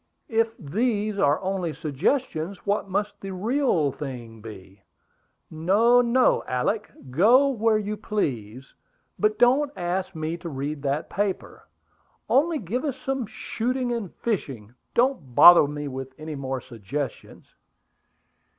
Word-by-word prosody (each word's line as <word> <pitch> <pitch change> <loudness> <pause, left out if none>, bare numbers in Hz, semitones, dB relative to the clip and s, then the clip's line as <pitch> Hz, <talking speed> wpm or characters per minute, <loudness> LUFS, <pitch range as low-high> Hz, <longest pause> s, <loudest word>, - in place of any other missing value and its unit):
If 225 0 0
these 210 - -1
are 145 -2 +3
only 185 -4 -2
suggestions, 165 - -2
what 200 0 -1
must 205 +1 -2
the 195 - -6
real 205 - +1
thing 120 -6 -8
be! 100 -3 -12 0.7
No, 205 +10 +4
no, 245 +1 +3
Alick! 130 - -1 0.2
Go 235 - +5
where 225 -4 +2
you 210 0 -3
please; 130 - -3 0.5
but 215 0 +2
don't 270 +5 +4
ask 185 +1 -3
me 160 +1 -3
to 170 0 -7
read 140 +1 -4
that 145 +3 -2
paper. 200 -1 -3 0.6
Only 315 +4 +3
give 235 - -3
us 280 -4 -2
some 270 -4 -3
shooting 245 +3 -3
and 225 -7 -4
fishing. 130 - -4 0.2
Don't 235 - +1
bother 175 -4 +9
me 145 0 -5
with 130 -1 -7
any 155 0 -6
more 135 -2 -4
suggestions." 125 +3 -7
185 Hz, 130 wpm, -25 LUFS, 140-230 Hz, 0.7 s, bother